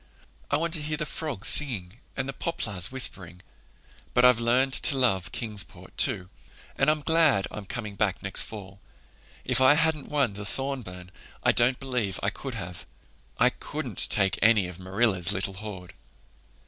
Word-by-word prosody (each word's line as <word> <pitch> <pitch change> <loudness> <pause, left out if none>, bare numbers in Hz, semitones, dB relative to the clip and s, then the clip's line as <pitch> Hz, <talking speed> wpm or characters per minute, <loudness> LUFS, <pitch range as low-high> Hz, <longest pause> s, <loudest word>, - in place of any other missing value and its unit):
I - - +2
want 165 +1 -2
to 160 - -1
hear 155 +1 -2
the 150 - -2
frogs 145 -8 -3
singing 115 -8 -1 0.2
and 135 -1 -1
the 135 - -4
poplars 105 - -3
whispering. 95 -9 -1 0.7
But 125 - +5
I've 125 -2 +6
learned 125 +3 +2
to 140 - +2
love 95 -8 +1
Kingsport, 105 -4 -4
too, 90 - +3 0.5
and 135 - +2
I'm 155 0 +1
glad 155 -10 +4
I'm 105 -2 -8
coming 110 -2 -5
back 100 -1 0
next 100 -1 +2
fall. 100 -2 -8 0.7
If 125 0 +3
I 130 +3 +7
hadn't 160 -2 0
won 140 -8 +1
the 100 +1 -7
Thorburn 105 -7 -5 0.3
I - - +5
don't 125 +2 +2
believe 125 -8 -2
I 100 - +1
could 130 +3 -7
have. 90 -5 -6 0.5
I - - +4
couldn't - - 0
take 95 -1 +2
any 110 -4 +4
of 90 0 -10
Marilla's 95 -1 +1
little 100 -1 -2
hoard." 95 -2 -8
115 Hz, 165 wpm, -27 LUFS, 95-135 Hz, 0.7 s, I